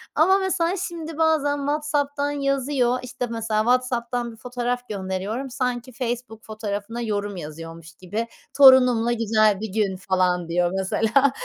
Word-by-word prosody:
Ama 380 +5 +5
mesela 370 -2 0
şimdi 325 -2 -7
bazen 310 -3 +2
WhatsApp'tan 285 0 -1
yazıyor. 275 -3 0
İşte, 250 0 -4
mesela 225 -2 -1
WhatsApp'tan 245 0 0
1 225 - -14
fotoğraf 245 0 -3
gönderiyorum. 200 +6 -3
Sanki 250 -1 -3
Facebook 240 -2 -5
fotoğrafına 215 +1 -5
yorum 205 -3 -2
yazıyormuş 165 +1 -9
gibi. 210 +7 -4 0.3
Torunumla 250 -4 +7
güzel 215 -3 +2
bir 220 - -3
gün 205 -4 0
falan 180 -2 0
diyor 175 +1 +1
mesela. 225 +8 +2
240 Hz, 130 wpm, -23 LUFS, 210-275 Hz, 0.3 s, Torunumla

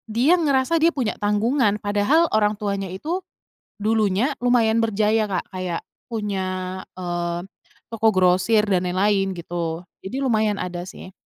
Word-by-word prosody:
dia 275 +9 +4
ngerasa 285 0 +2
dia 335 +2 +4
punya 250 -6 -2
tanggungan 210 +1 +1
padahal 205 +12 +2
orang 210 -1 +3
tuanya 200 -1 -2
itu 325 - -3 0.6
dulunya 215 +3 +2
lumayan 230 -2 +3
berjaya, 215 0 +2
Kak, 185 -3 -2
kayak 185 -2 -3 0.3
punya, 205 -4 -2 0.5
eee, 175 -1 -3 0.5
toko 225 0 +1
grosir 185 +4 +4
dan 185 -3 +1
lain-lain 195 +1 +1
gitu, 170 0 -4 0.2
jadi 260 +8 -4
lumayan 215 -4 +2
ada 180 -1 -5
sih. 185 - -10
210 Hz, 135 wpm, -22 LUFS, 185-230 Hz, 0.6 s, dia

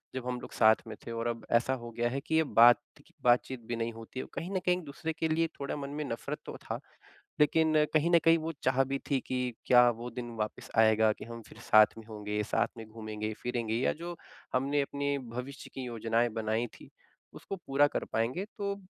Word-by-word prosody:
जब 130 -1 -4
हम 125 -1 -2
लोग - - -9
साथ 110 0 +6
में 110 - -6
थे 115 - -5
और 115 0 -2
अब 115 -1 -3
ऐसा 120 +3 +3
हो 120 - -7
गया 120 +1 0
है 135 +2 -2
कि 160 +2 -2
ये 160 - +5
बात 120 -3 +7 0.5
बातचीत 125 +1 +3
भी 120 - -2
नहीं 115 0 -2
होती 115 +3 -8
है। - - -3
कहीं 175 - -4
न - - +2
कहीं 180 0 +3
एक-दूसरे 160 0 -5
के 160 0 -1
लिए 165 +1 +2
थोड़ा 140 - -3
मन 140 -1 -5
में - - -1
नफ़रत 115 - -4
तो - - -7
था। - - -4 0.6
लेकिन 160 +1 +4 0.2
कहीं 155 +3 +3
न 170 - +7
कहीं 165 0 +6
वो 160 +1 -3
चाह 130 +1 +3
भी 135 +1 -2
थी 135 - +3
कि 125 -2 -1
क्या 125 -1 +7
वो 120 +1 -6
दिन 120 0 -6
वापस 105 0 -4
आएगा 110 -1 +5
कि - - -9
हम 115 0 -8
फिर - - -14
साथ 110 0 +6
में 110 - -10
होंगे, 105 -1 -3
साथ - - +1
में 110 - -7
घूमेंगे-फिरेंगे 110 +1 -4
या 125 - +2
जो 170 +2 -7 0.4
हमने 140 +3 +2
अपने 140 0 -1 0.2
भविष्य 135 +3 -6
की 130 - -5
योजनाएँ 115 0 +1
बनाईं 110 +2 0
थी - - -14 0.4
उसको 195 - -6
पूरा 145 -4 +3
कर - - -2
पाएँगे? 120 - 0
तो 200 0 -2
125 Hz, 220 wpm, -31 LUFS, 115-145 Hz, 0.6 s, बात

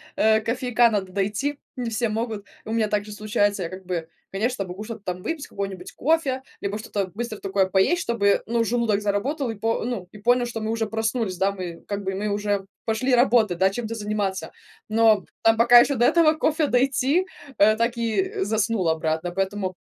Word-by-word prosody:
э, 220 0 +4
кофейка 240 0 +2
надо 195 -3 -2
дойти. 210 +9 -1 0.2
Не 245 -3 -3
все 230 +1 0
могут. 220 -1 -3 0.2
У 220 - -5
меня 225 -1 +1
также 210 0 -2
случается, 205 -2 0
я 165 - -4
как 185 +1 -9
бы, 170 -3 -3 0.2
конечно, 215 +2 -1
могу 185 +3 -7
что-то 225 -2 -8
там 180 +1 -8
выпить, 325 -3 -4
какой-нибудь 195 -2 -6
кофе, 275 -3 0 0.2
либо 200 +1 -2
что-то 205 -3 -3
быстро 230 -1 -4
такое 195 0 +1
поесть, 190 - +2
чтобы, 200 -4 +2
ну, 230 0 +1
желудок 230 -3 +1
заработал 230 +7 -1
и 225 - -3
по 225 +3 -1
ну, 225 -6 -4
и 210 - -12
понял, 245 +3 +3
что 230 -2 -5
мы 220 - -3
уже 225 0 0
проснулись, 220 -3 -2
да. 195 +1 +2
Мы 180 -4 -7
как 200 0 -3
бы 190 0 -2
мы 200 +2 -2
уже 205 -1 -1 0.2
пошли 250 +4 +1
работать, 235 -7 +3
да, 190 +2 +3
чем-то 230 +1 -4
заниматься. 205 -3 -2 0.4
Но 220 -3 +4 0.2
там 225 0 +4
пока 240 +1 +8
еще 280 +3 +3
до 240 0 +3
этого 330 -2 +5
кофе 310 -1 +1
дойти, 270 +7 +2 0.3
э, 215 +2 +5
так 235 +2 0
и 215 -5 -1
заснул 215 -3 0
обратно. 160 +2 0
Поэтому 190 0 -2
215 Hz, 195 wpm, -24 LUFS, 195-240 Hz, 0.4 s, пока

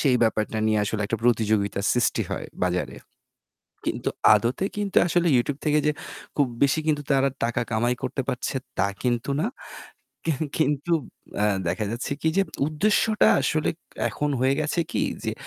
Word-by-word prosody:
সেই 130 -4 +4
ব্যাপারটা 110 -1 +1
নিয়ে 110 -1 +2
আসলে 105 +1 -2
একটা 110 +2 -2
প্রতিযোগিতা 110 -4 +2
সৃষ্টি 125 -2 +1
হয় - - -3 0.2
বাজারে। 90 -7 -1 1.0
কিন্তু - - -3 0.3
আদতে 120 - 0
কিন্তু 205 -2 -1
আসলে 175 0 +2
YouTube 135 +4 -1
থেকে 150 0 +3
যে 150 - +4 0.4
খুব 145 -2 +3 0.2
বেশি 140 +3 +3
কিন্তু 150 -2 +2
তারা 135 0 +3
টাকা 120 +1 0
কামাই 120 +2 +1
করতে 130 +1 -1
পারছে 125 - -2 0.2
তা 100 - +3 0.2
কিন্তু 120 0 0
না। - - +1 0.8
কেং 160 -5 -1 0.2
কিন্তু 150 +2 +1 0.5
অ্যা 105 - +3 0.2
দেখা 105 - -1
যাচ্ছে 120 +4 -3
কি 160 - +1
যে 195 - +5 0.2
উদ্দেশ্যটা 210 +7 +2
আসলে 155 -1 +1 0.4
এখন 150 0 -2
হয়ে 130 +1 +3
গেছে 155 +3 0
কি - - 0 0.2
যে, - - -1
130 Hz, 160 wpm, -25 LUFS, 110-150 Hz, 1.0 s, যে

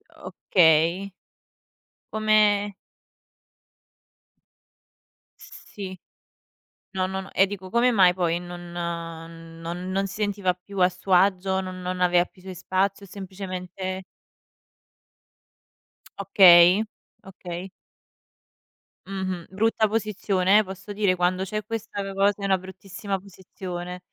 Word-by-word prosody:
Okay. 170 +3 +2 1.0
Come 210 -2 +3 2.7
Sì, 185 -3 -10 0.9
no, 185 -2 -1
no, 190 0 -3
no 190 - -12
e 195 - +4
dico, 190 -2 -7
come 240 +3 +3
mai 185 -5 +5
poi 175 -2 0
non 175 0 -9
non 165 0 -6
non 195 +1 0
si 195 - -9
sentiva 200 -3 0
più 190 +2 -9
a 180 0 +5
suo 185 +1 -3
agio, 190 +1 +3
non 185 -1 -7
non 180 0 -4
aveva 175 0 +4
più 185 - -22
suoi 185 -1 -8
spazi 190 +3 -1
o - - -9
semplicemente 185 -1 -6 2.2
Okay, 185 0 +7 0.4
okay. 185 -1 -8 1.4
Mh-mh, 190 -3 -4
brutta 220 +2 +1
posizione, 205 -2 +2
eh, - - +2
posso 190 +1 -8
dire? 200 -3 +1
Quando 180 +1 +1
c'è 215 +3 -3
questa 225 -2 -5
cosa 200 +1 +1
è - - -2
una 190 -1 +3
bruttissima 195 +1 -6
posizione. 180 -2 -8
190 Hz, 110 wpm, -25 LUFS, 180-200 Hz, 2.7 s, Okay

